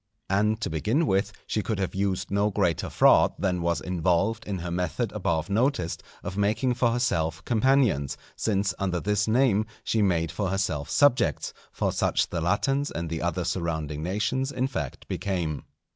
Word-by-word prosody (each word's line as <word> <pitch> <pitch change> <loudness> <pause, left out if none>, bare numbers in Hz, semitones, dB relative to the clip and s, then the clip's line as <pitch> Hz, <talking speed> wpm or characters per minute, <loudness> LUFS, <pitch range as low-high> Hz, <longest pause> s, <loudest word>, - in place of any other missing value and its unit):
And, 105 +2 +2
to - - -1
begin 110 - +1
with, 100 -3 +1
she 110 - -1
could 110 0 -2
have 95 -2 -2
used 95 0 -1
no 100 +1 +2
greater 95 -5 0
fraud - - +5
than 90 -3 0
was 85 0 0
involved 90 +5 0
in 100 -2 -2
her 85 0 -5
method 90 -2 -1
above 80 -2 -1
noticed, 105 - 0 0.2
of 95 - -5
making 110 +5 +1
for 120 0 +2
herself 80 -10 0
companions; 120 - +2 0.2
since 100 -3 0
under 90 -3 0
this 100 +2 0
name 110 -2 +3 0.2
she 110 - +1
made 85 -5 +1
for 100 -3 -2
herself 90 -7 -1
subjects, 120 - +2 0.2
for - - -1
such - - +1
the 85 - -2
Latins 135 - +1
and 85 -1 -4
the 80 - -2
other 90 +1 -1
surrounding 80 -4 -2
nations, 105 - -1
in 130 -1 -1
fact, 80 - -5
became. 85 -5 -2
95 Hz, 170 wpm, -26 LUFS, 85-110 Hz, 0.2 s, fraud